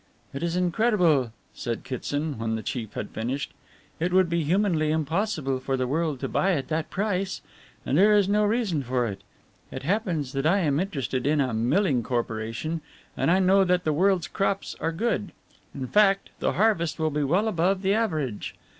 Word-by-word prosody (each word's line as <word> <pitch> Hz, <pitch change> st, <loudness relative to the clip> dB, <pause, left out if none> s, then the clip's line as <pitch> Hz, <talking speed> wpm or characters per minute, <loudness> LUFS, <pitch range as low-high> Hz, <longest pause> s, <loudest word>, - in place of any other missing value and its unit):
"It 140 Hz, -, -5 dB
is 170 Hz, 0 st, -1 dB
incredible," 175 Hz, -, +2 dB, 0.2 s
said 115 Hz, -2 st, -4 dB
Kitson 145 Hz, +2 st, -3 dB
when 110 Hz, 0 st, -1 dB
the 110 Hz, -, -4 dB
chief 115 Hz, -6 st, -4 dB
had 105 Hz, -, -5 dB
finished. 130 Hz, +4 st, -3 dB, 0.5 s
"It 175 Hz, +3 st, 0 dB
would 185 Hz, -2 st, +3 dB
be 170 Hz, -1 st, +1 dB
humanly 170 Hz, -2 st, +1 dB
impossible 155 Hz, -3 st, -1 dB
for 135 Hz, +1 st, -2 dB
the 130 Hz, -, 0 dB
world 150 Hz, +1 st, -1 dB
to -, -, -1 dB
buy 195 Hz, 0 st, +1 dB
at 135 Hz, -6 st, -2 dB
that 160 Hz, 0 st, -1 dB
price. 195 Hz, -2 st, -1 dB, 0.5 s
And 140 Hz, -, +2 dB
there 210 Hz, +2 st, +6 dB
is 200 Hz, -2 st, +3 dB
no 210 Hz, +1 st, +2 dB
reason 210 Hz, -7 st, +1 dB
for 125 Hz, -1 st, 0 dB
it. 100 Hz, -3 st, -5 dB, 0.5 s
It -, -, -7 dB
happens 170 Hz, -, -1 dB
that 135 Hz, +2 st, 0 dB
I 185 Hz, +5 st, +4 dB
am 145 Hz, -4 st, +1 dB
interested 135 Hz, -, -2 dB
in 150 Hz, +1 st, +2 dB
a 130 Hz, -4 st, +1 dB
milling 125 Hz, -, +2 dB
corporation 115 Hz, +6 st, -3 dB, 0.3 s
and -, -, +1 dB
I 180 Hz, -, +5 dB
know 190 Hz, +1 st, +4 dB
that 180 Hz, -1 st, +1 dB
the 155 Hz, -, +1 dB
world's 185 Hz, +2 st, +2 dB
crops 195 Hz, 0 st, -1 dB
are 165 Hz, +2 st, -1 dB
good 210 Hz, +3 st, -1 dB, 0.4 s
in 135 Hz, -2 st, -5 dB
fact, 195 Hz, +6 st, +3 dB
the -, -, 0 dB
harvest 175 Hz, -7 st, +1 dB
will 160 Hz, -1 st, 0 dB
be 150 Hz, +1 st, -1 dB
well 180 Hz, +10 st, +2 dB
above 190 Hz, 0 st, +1 dB
the 195 Hz, +1 st, +3 dB
average. 155 Hz, -, -2 dB
160 Hz, 190 wpm, -26 LUFS, 135-195 Hz, 0.5 s, there